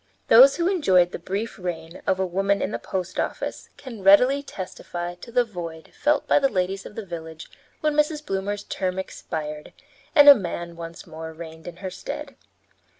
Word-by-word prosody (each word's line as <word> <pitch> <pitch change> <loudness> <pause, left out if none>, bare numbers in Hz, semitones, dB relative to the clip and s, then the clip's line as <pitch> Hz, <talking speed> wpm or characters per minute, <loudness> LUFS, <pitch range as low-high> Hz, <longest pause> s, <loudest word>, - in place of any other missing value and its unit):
Those 265 +4 +9
who 340 0 0
enjoyed 190 - +3
the - - -6
brief 200 +6 -4
reign 170 -2 -6
of 190 - +2
a 190 - +1
woman 195 +2 +1
in 190 - -2
the - - -3
post 185 -1 -4
office - - -3
can 235 -6 -9
readily 250 +9 +6
testify 175 -7 -6
to 175 +6 -12
the 245 +1 +3
void 170 -7 -8
felt 295 -1 +1
by - - +5
the 275 -1 +2
ladies 190 -1 -2
of - - -14
the 220 - -6
village 160 -3 -8 0.3
when 305 -1 +1
Mrs. 300 0 +1
Bloomer's 200 0 -2
term 185 -1 -3
expired 150 -5 -6 0.4
and 290 -2 +8
a 285 - +14
man 170 -6 -5
once 165 0 -9
more 160 -1 -8
reigned 160 0 -10
in 175 - -7
her 185 - -3
stead. - - -7
190 Hz, 185 wpm, -24 LUFS, 170-230 Hz, 0.4 s, a